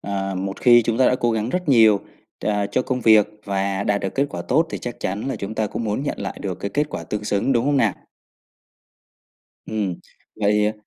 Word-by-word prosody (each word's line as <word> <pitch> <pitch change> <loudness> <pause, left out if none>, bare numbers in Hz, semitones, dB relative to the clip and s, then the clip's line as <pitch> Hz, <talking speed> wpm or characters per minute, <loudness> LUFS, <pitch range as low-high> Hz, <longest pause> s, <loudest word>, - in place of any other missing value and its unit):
à, 95 -1 -3
một 95 +1 -4
khi 120 -1 +6
chúng 115 +1 -1
ta 130 - +5
đã - - +2
cố 120 -1 +1
gắng 110 0 -1
rất 180 +1 -2
nhiều, 110 -6 +6 0.4
à, 105 -1 0
cho 105 +5 0
công 125 0 -2
việc 110 -3 +6 0.2
và 100 0 -1
đạt 100 0 +1
được 95 - -4
kết 140 +1 +1
quả 85 - -5
tốt 160 - +2
thì - - -4
chắc 120 -1 -7
chắn 100 +7 -3
là - - -2
chúng 100 +3 -5
ta 110 -1 0
cũng 115 +3 -4
muốn 105 +5 -1
nhận 145 - -3
lại 100 -1 -5
được 95 -2 -2
cái 100 - -3
kết 150 +1 +1
quả - - -6
tương 105 0 -4
xứng, 105 +6 +1
đúng 120 -1 +2
hông 145 0 +2
nè? 110 -7 +2 1.7
Ừm, 105 -4 -2 0.4
vậy 105 0 +2
105 Hz, 225 wpm, -22 LUFS, 100-120 Hz, 1.7 s, khi